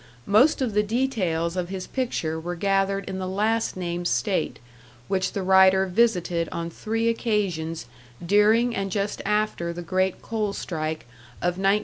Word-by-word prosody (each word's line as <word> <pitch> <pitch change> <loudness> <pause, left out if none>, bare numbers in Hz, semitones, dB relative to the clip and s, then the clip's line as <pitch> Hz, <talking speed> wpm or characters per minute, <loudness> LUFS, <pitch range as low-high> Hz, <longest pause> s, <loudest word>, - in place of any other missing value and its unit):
Most 260 +8 +4
of 235 -5 -2
the 210 - +3
details 205 -8 -1
of 180 -1 -2
his 190 -1 -5
picture 170 -11 -2
were 175 +2 -4
gathered 195 +1 0
in 190 0 -4
the 185 - -3
last 215 +3 0
named 175 -1 -2
state, 200 0 0 0.5
which 190 -1 0
the 195 - -2
writer 190 0 +5
visited 180 -5 +1
on 170 0 -4
three 225 +5 -2
occasions 190 - -1 0.4
during 220 +5 +4
and 195 -2 -2
just 200 +1 -2
after 210 -5 0
the 175 +1 -6
great 185 +1 0
coal 215 -3 -2
strike 155 -4 -3 0.4
of 175 +2 -1
1913 195 0 +4
14. 210 - +2
195 Hz, 160 wpm, -25 LUFS, 175-215 Hz, 0.5 s, writer